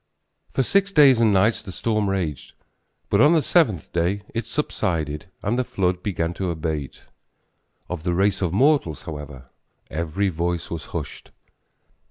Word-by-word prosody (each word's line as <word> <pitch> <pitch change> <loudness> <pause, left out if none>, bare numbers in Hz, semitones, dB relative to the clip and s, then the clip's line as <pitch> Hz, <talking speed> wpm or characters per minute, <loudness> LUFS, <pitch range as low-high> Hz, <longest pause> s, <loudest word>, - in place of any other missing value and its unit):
For 135 - +1
six 195 +8 +2
days 140 -8 +6
and 115 -2 +4
nights 100 +4 +3
the 100 - -8
storm 110 +1 0
raged, 90 -7 -3 0.6
but 100 - +4
on 150 +3 +6
the 160 -3 +3
seventh 115 - +1
day 90 +4 0
it 115 -1 -3
subsided 80 - -2 0.2
and 120 +5 0
the - - +2
flood 90 -5 -1
began 85 -4 -2
to 95 0 -3
abate. 80 -4 -4 0.8
Of 90 -3 -5
the 85 +1 -1
race 100 +2 +2
of 90 -4 0
mortals, 120 - +2
however, 75 -5 -8 0.4
every 85 +5 -1
voice 85 0 -2
was 85 -3 -5
hushed. - - -7
95 Hz, 155 wpm, -23 LUFS, 80-115 Hz, 0.8 s, days